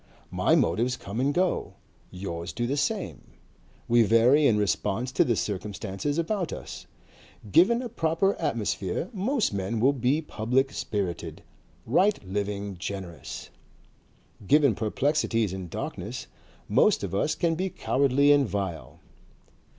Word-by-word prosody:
My - - +3
motives 125 +3 +1
come 100 +4 -6
and 135 +3 +2
go. 180 +4 0 0.3
Yours 85 -2 -6
do 120 - -2
the 135 +4 -1
same. 145 - -3 0.5
We 120 0 +5
vary 120 +7 +5
in 110 - +3
response 105 +4 0
to - - +3
the 120 - +1
circumstances 100 - -3
about 180 +2 -1
us. - - -8 0.6
Given 235 - +5
a - - -3
proper 195 -2 +1
atmosphere, 105 - -2
most 220 - 0
men 100 +3 -2
will 135 +5 +4
be 135 +3 +1
public 135 -2 0
spirited, 95 -5 -4 0.4
right 190 - +3
living, 100 0 -3
generous. 85 -10 -6 1.0
Given 145 -4 +5
perplexities 115 -2 0
and 95 -2 -6
darkness, - - -5 0.4
most - - +3
of - - -4
us 150 +10 +1
can 170 -1 +1
be 185 +4 -2
cowardly 140 -2 +2
and 140 -5 +4
vile. 85 -10 -4
120 Hz, 130 wpm, -27 LUFS, 100-150 Hz, 1.0 s, We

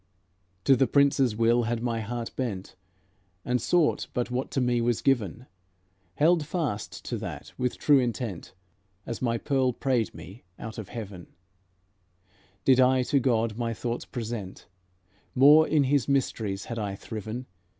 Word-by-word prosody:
To 135 - +5
the 130 +1 +3
Prince's 140 -4 +3
will 115 +1 +3
had 115 0 -2
my 115 -2 -1
heart 115 +1 -4
bent, 100 -9 -4 0.7
And 125 -1 0
sought 170 +3 +2
but 125 -1 -1
what 125 +2 -2
to - - -1
me 125 -1 +1
was 120 -1 +1
given, 120 - 0 0.7
Held 160 +1 +3
fast 145 - -4
to - - -3
that, - - -7
with 125 -1 -2
true 145 -2 +5
intent, 120 -8 -3 0.5
As 115 - -5
my 115 -2 +1
Pearl 130 -1 +1
prayed 125 -5 0
me 90 +8 -11
out 110 0 -7
of 105 - -7
heaven; 100 -7 -7 1.4
Did 130 -1 +5
I 130 0 +4
to 140 +3 +2
God 115 -3 0
my 115 -1 -1
thoughts 120 +1 -3
present, 115 -5 -6 0.7
More 150 +4 +7
in 150 -2 +3
His 140 -1 +1
mysteries 110 -7 -1
had 115 -1 -5
I 100 -2 -3
thriven. 110 +4 -6
120 Hz, 150 wpm, -27 LUFS, 110-135 Hz, 1.4 s, More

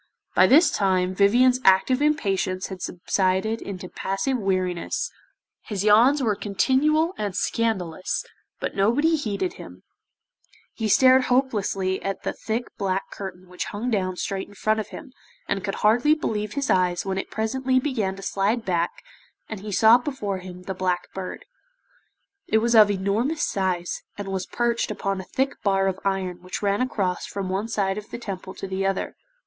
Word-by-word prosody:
By - - +6
this 315 +6 +6
time 185 -2 +1
Vivien's 245 +6 +4
active 195 +8 +4
impatience 195 -11 0
had 190 -2 -7
subsided 190 +5 0
into 185 -2 -6
passive 195 +9 -2
weariness, 185 -3 -1 0.6
his 200 -3 -2
yawns 240 +7 +5
were 220 -3 +2
continual 275 - +2
and 205 -3 -2
scandalous, 185 -7 -1 0.3
but - - -4
nobody 255 +12 +3
heeded 285 - -2
him, - - -12 0.9
he 225 - -2
stared 255 +4 +6
hopelessly 205 -7 0
at 195 0 -4
the - - -2
thick 230 +2 -3
black 195 -1 -1
curtain 185 -2 -8
which 180 0 -5
hung 230 +5 -3
down 185 -4 0
straight 190 +1 -3
in 205 - -16
front 215 +2 +1
of 215 - -3
him, 275 -5 -10 0.3
and 195 - -1
could 195 -1 -2
hardly 245 +8 +5
believe 215 -8 -3
his 280 -1 -1
eyes 180 -1 +2
when 190 0 -1
it - - -5
presently 255 +4 0
began 225 -9 -1
to 195 - -10
slide 205 +5 0
back, 175 -2 +1 0.6
and 220 - -6
he 210 +2 -7
saw 220 +4 +6
before 245 -8 -3
him 180 0 -10
the 190 - -4
Black 180 -1 -2
Bird. 190 - -6 1.0
It 220 - +3
was 235 +2 +2
of 215 -2 +8
enormous 205 +10 0
size, 185 -3 -1 0.2
and 200 -1 -5
was 190 -1 -3
perched 235 -1 0
upon 195 -2 -2
a - - -12
thick 270 +1 -2
bar 195 -1 +2
of 190 0 -1
iron 190 -2 -2
which 185 +3 -6
ran 200 +2 +1
across 195 -8 -1
from 195 -2 -4
one 195 +4 -1
side 200 -3 -1
of 210 - -13
the - - -6
Temple 190 -4 -7
to - - -6
the 190 0 -2
other. 195 0 -1
200 Hz, 170 wpm, -24 LUFS, 190-235 Hz, 1.0 s, of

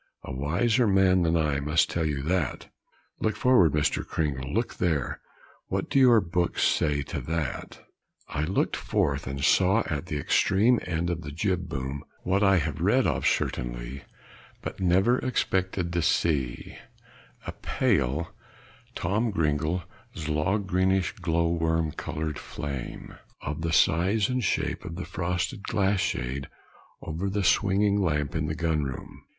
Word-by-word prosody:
"A - - -6
wiser 105 - +1
man 95 -2 +4
than 85 0 +2
I 75 -3 +1
must 75 +4 +2
tell 80 -2 0
you 70 -2 -2
that; 85 0 -1 0.5
look 110 - 0
forward 110 - +4
Mr. 75 0 +1
Cringle 70 -3 -2
look 115 +4 -1
there; 80 -8 -1 0.5
what - - -3
do 135 - +4
your 125 -4 +7
books 90 -2 -1
say 75 -2 +2
to - - -5
that?" 80 -4 -4 0.4
I 75 +1 -2
looked 95 +4 0
forth, - - -1
and 70 +1 -4
saw 95 +6 +4
at 80 +1 -3
the 75 - -2
extreme 105 - +3
end 85 0 -1
of 85 -1 -3
the 75 -2 -7
jib 90 +2 -1
boom, 65 +1 -4 0.2
what 95 +2 +1
I 95 -2 +5
have 80 - -2
read - - +3
of, - - +1
certainly, - - -2 0.6
but - - -6
never 95 +7 +3
expected 95 -8 -1
to 85 - +1
see, 70 -7 0 0.7
a - - -3
pale, 85 - 0 0.7
greenish, 90 - 0
glow 85 -1 +1
worm 80 -1 0
colored 80 0 -4
flame, 70 -4 -6 0.2
of 75 +2 -4
the 85 0 -1
size 95 +7 +3
and 125 -1 0
shape 95 - -1
of 85 - -6
the 90 - -5
frosted 90 +2 -2
glass 100 -2 +1
shade 70 -3 -2 0.6
over 85 +6 -3
the 100 0 -1
swinging 100 +2 +3
lamp 75 -5 0
in 75 -1 -1
the 80 - -2
gun 80 -2 0
room. 65 -1 -7
85 Hz, 145 wpm, -27 LUFS, 75-95 Hz, 0.7 s, your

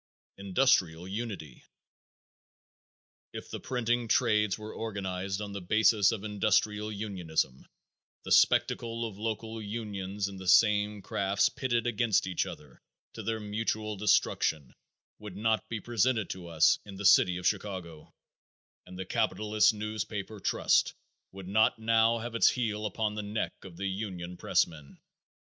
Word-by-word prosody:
Industrial 95 -5 +2
Unity. 100 - -6 1.7
If - - -8
the - - -5
printing 120 -2 -1
trades 105 -4 +2
were 110 0 -8
organized 95 -2 -4
on 100 -1 -6
the 100 - -5
basis 105 +2 +4
of 105 -3 -4
industrial 105 0 0
unionism 90 -10 -3 0.6
the - - -7
spectacle 115 0 +3
of 105 -2 -11
local 110 0 -4
unions 100 -2 -4
in 100 -1 -8
the 95 0 -8
same 105 +1 +4
crafts 100 0 +1
pitted 120 -3 -1
against 115 -2 +1
each 90 -3 -1
other - - -11 0.3
to - - -7
their 115 -1 -2
mutual 110 0 -2
destruction 80 -8 +1 0.5
would 105 -3 -9
not 110 +1 0
be 115 - -3
presented 115 -1 0
to 90 -2 -7
us 80 -1 +4
in 100 -1 -10
the 100 +1 -6
City 90 -2 +6
of 90 - -7
Chicago, 95 -6 -3 0.8
and 90 0 -10
the 95 - -5
capitalist 105 +3 +2
newspaper 105 -1 -5
trust - - +2 0.4
would 95 -1 -10
not 110 +3 +3
now 115 +1 +3
have 120 +1 -6
its 115 - +5
heel 110 -3 -2
upon 105 +1 -2
the 105 - -4
neck 105 +1 -3
of 90 -3 -11
the 100 - -4
union 95 -3 -4
pressmen. 75 -4 -1
105 Hz, 140 wpm, -30 LUFS, 95-110 Hz, 1.7 s, City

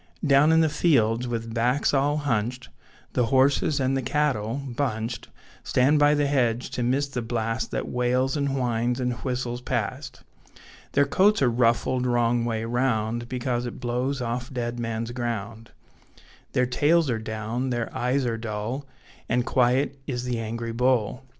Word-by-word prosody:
Down 145 +2 +5
in 160 0 +5
the 160 - +4
fields, 125 -7 +2
with 115 -1 -4
backs 125 +6 +1
all 145 +2 +2
hunched, 125 -3 -2 0.4
The 125 -2 +2
horses 135 +3 +3
and 135 0 +1
the 135 - 0
cattle, 130 -5 0
bunched, 125 -4 -3 0.4
Stand 140 +4 +3
by 145 0 +5
the 145 0 +2
hedge 125 -4 0
to - - -3
miss 130 +4 +1
the 130 -3 -4
blast 115 0 -2
That - - -3
wails 125 +2 0
and 140 -2 0
whines 120 0 0
and 125 -1 0
whistles 125 -2 -3
past; 130 +3 -4 0.7
Their 140 - +4
coats 200 +9 +3
are 125 - +3
ruffled 125 +2 +1
wrong 120 -1 +2
way 115 -1 -2
round, 120 -1 -1
Because 125 -1 -2
it 120 - -7
blows 125 +2 -2
off 120 +2 -3
'Deadman's 120 -2 -3
Ground'; 115 -2 -4 0.8
Their 125 - +3
tails 150 +6 +2
are 115 - -1
down, 110 +4 -3
their 120 -2 -3
eyes 130 +2 0
are 115 -2 -1
dull, 115 +5 -4 0.4
And 125 +1 +1
quiet 130 +2 +1
is 125 -3 -3
the 125 -2 -2
angry 115 +1 -4
bull. 125 +1 0
125 Hz, 155 wpm, -25 LUFS, 115-135 Hz, 0.8 s, Down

